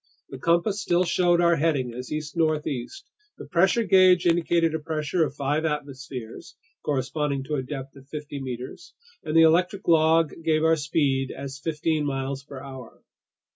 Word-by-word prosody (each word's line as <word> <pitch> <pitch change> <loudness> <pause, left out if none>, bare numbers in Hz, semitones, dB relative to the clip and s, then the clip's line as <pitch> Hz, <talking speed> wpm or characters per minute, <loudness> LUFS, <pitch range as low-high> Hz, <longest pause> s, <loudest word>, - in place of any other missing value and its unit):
The 135 - -8
compass 170 +7 +1
still 175 -3 +2
showed 175 -1 +2
our 170 -1 +4
heading 140 -6 0
as 125 +1 -7
east 150 0 -4
northeast, 155 - -2 0.3
the - - -9
pressure 190 +7 +2
gauge 185 -3 +5
indicated 170 -1 +2
a 160 - -1
pressure 155 +2 -1
of 140 -3 -3
five 145 +2 -1
atmospheres 140 -6 -5 0.3
(corresponding 140 0 -1
to 150 - -6
a 140 - 0
depth 135 0 -7
of 135 0 -16
fifty 145 -2 -6
meters), 130 +6 -7 0.3
and 155 0 0
the 165 - +8
electric 180 +4 +2
log 160 -1 +4
gave 155 -1 +2
our 160 0 +4
speed 140 -3 0
as 135 0 -7
fifteen 155 0 -1
miles 135 -1 -3
per 140 -1 -10
hour. 130 -3 -11
150 Hz, 165 wpm, -25 LUFS, 135-165 Hz, 0.3 s, the